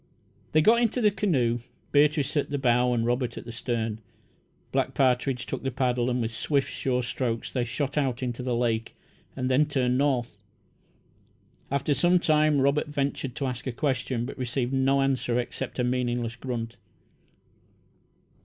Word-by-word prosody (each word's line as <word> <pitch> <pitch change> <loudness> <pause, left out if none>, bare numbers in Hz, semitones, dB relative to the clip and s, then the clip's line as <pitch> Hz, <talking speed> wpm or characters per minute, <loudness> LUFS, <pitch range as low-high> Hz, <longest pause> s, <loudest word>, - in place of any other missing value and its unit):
They 155 0 +5
got 235 +5 +5
into 240 +1 +1
the 210 -3 +4
canoe, 140 - +1 0.3
Beatrice 150 0 +3
at 145 - +1
the 145 - -1
bow 125 -2 +3
and 115 -2 +1
Robert 120 0 -1
at - - -7
the 115 - -7
stern. 115 -2 -2 0.7
Black - - 0
Partridge 125 -1 +1
took - - -4
the 135 - -1
paddle, 125 -1 0
and 125 -1 0
with 115 0 -3
swift, 140 +4 0
sure 125 -1 -1
strokes 120 -1 -2
they 125 - 0
shot 140 +4 -1
out 130 -3 -1
into 125 0 -3
the 125 -1 -1
lake 115 -2 -1 0.4
and 130 -1 -2
then 135 +4 +3
turned 130 -3 +1
north. 130 -4 0 1.3
After 140 +2 +1
some 175 +7 +4
time 155 -3 +3
Robert 140 +3 +2
ventured 140 -3 -2
to 140 - -2
ask 125 0 -4
a - - 0
question, 125 -2 -1
but 135 - -8
received 125 +1 -1
no 135 +1 +3
answer 130 -3 0
except 120 - -4
a 125 - +1
meaningless 120 -2 -1
grunt. 120 -2 -5
130 Hz, 165 wpm, -27 LUFS, 120-140 Hz, 1.3 s, They